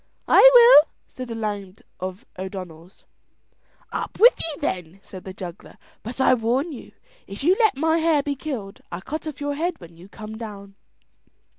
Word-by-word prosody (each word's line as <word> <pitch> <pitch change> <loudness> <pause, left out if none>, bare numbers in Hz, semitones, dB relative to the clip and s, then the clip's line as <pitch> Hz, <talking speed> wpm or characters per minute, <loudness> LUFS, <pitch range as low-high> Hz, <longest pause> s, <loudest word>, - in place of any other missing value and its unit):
"I - - +8
will," 470 -10 +8 0.2
said 255 -1 -9
a 230 - -5
lad 205 -3 -5 0.2
of 185 +5 -6
O'Donnell's. 185 -2 -9 0.9
"Up - - -5
with 480 +3 +8
you 315 -3 -3
then," 180 - -4
said 185 -2 -11
the 190 - -6
juggler; 180 -3 -10 0.2
"but 235 +4 -8
I 265 - +4
warn 250 +7 0
you 270 - -11 0.3
if 200 +6 -8
you 355 +5 +4
let 440 - +3
my 320 +3 +1
hare 315 -3 +2
be 285 - -2
killed 250 -9 -7
I'll 175 +1 -6
cut 310 +1 -6
off 300 -2 -7
your 290 0 -2
head 335 +4 -3
when 170 -1 -14
you 180 +3 -15
come 215 +1 -9
down." 200 -3 -9
230 Hz, 175 wpm, -23 LUFS, 190-305 Hz, 0.9 s, I